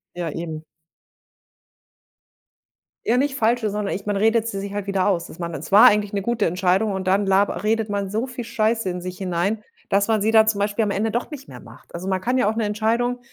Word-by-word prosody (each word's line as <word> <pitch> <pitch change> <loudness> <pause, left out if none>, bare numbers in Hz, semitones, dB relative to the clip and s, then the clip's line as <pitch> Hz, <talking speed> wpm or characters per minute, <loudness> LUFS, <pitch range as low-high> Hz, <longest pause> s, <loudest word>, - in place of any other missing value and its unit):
Ja 175 -2 -3
eben. 160 -1 -6 2.4
Ja 235 - +3
nicht 275 +1 0
falsche, 230 -2 +1
sondern 210 0 -2
ich 195 +3 -6
man 205 - 0
redet 225 +2 +2
sie 195 -3 -4
sich 200 0 -6
halt 205 -1 -4
wieder 195 0 +1
aus. 175 -4 0
Dass - - -12
man 170 -1 -5
es 160 +4 -7
war 205 +3 +8
eigentlich 205 -1 +2
'ne 200 -1 -1
gute 235 -4 0
Entscheidung 185 +4 +1
und 190 -1 -3
dann 195 +1 +2
laber 195 -2 +2
redet 220 0 +1
man 200 -1 -2
so 220 +4 -1
viel 250 -2 -7
Scheiße 225 -2 0
in 180 0 -4
sich 180 +2 -7
hinein, 190 +4 -1 0.3
dass 200 +1 +2
man 215 -2 +1
sie 220 - +2
da 220 -1 +6
zum 215 -2 +1
Beispiel 205 +2 0
am 210 - 0
Ende 210 +3 -1
doch 240 - -2
nicht 285 -3 -9
mehr - - -11
macht. - - -16
Also, 175 +2 -6
man 190 -1 0
kann 250 +6 0
ja 210 - +3
auch 220 - -2
'ne 225 -1 0
Entscheidung, 230 +4 0
205 Hz, 235 wpm, -22 LUFS, 190-225 Hz, 2.4 s, war